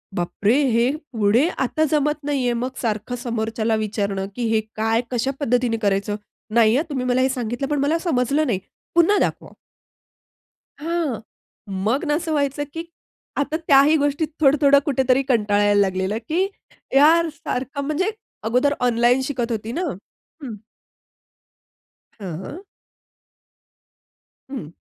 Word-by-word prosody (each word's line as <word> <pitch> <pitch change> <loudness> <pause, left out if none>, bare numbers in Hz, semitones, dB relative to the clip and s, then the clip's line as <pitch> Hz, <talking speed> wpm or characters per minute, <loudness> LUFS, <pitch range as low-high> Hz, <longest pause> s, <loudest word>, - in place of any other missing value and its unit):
बापरे! 200 +6 +1 0.2
हे 235 +3 +3 0.2
पुढे 225 +5 +3 0.2
आता 310 +5 0
जमत 300 0 +1
नाहीये 270 -4 0
मग 240 +2 -2
सारखं 220 +1 -2
समोरच्याला 225 -2 -1
विचारणं, 200 -2 -2
की 245 - -3
हे 220 - +3
काय, 225 +1 +1
कशा 250 +2 0
पद्धतीने 245 -4 +1
करायचं? 200 0 0 0.4
नाहीये 235 +3 +5
तुम्ही 260 -3 -2
मला 250 0 +2
हे 260 - +3
सांगितलंपण 260 +3 -2
मला 290 +4 +2
समजलं 295 -2 +1
नाही. 210 -7 0 0.4
पुन्हा 345 +5 +5
दाखवा? - - -1 1.3
हां. 320 -6 -1 0.6
मग 245 +9 +1
ना, 295 -2 +1
असं 325 +1 -2
व्हायचं, 285 -1 0
की 330 0 -5 0.5
आता 290 +2 0
त्याही 285 +2 +6
गोष्टीत 290 +2 0
थोडं-थोडं 280 -1 +5
कुठेतरी 265 -2 +2
कंटाळायला 205 -4 +3
लागलेलं, 190 +2 0
की 355 +5 +2 0.5
यार 325 +4 +6
सारखं 265 0 -4
म्हणजे 315 +8 0 0.3
अगोदर 250 +6 +2
ऑनलाईन 245 +1 +3
शिकत 250 -4 -2
होती 220 +1 -4
ना 340 - -2 0.6
हं. 240 -6 -6 1.6
हां. 190 - -7 1.9
हं. 250 - -6
250 Hz, 125 wpm, -22 LUFS, 225-290 Hz, 1.9 s, त्याही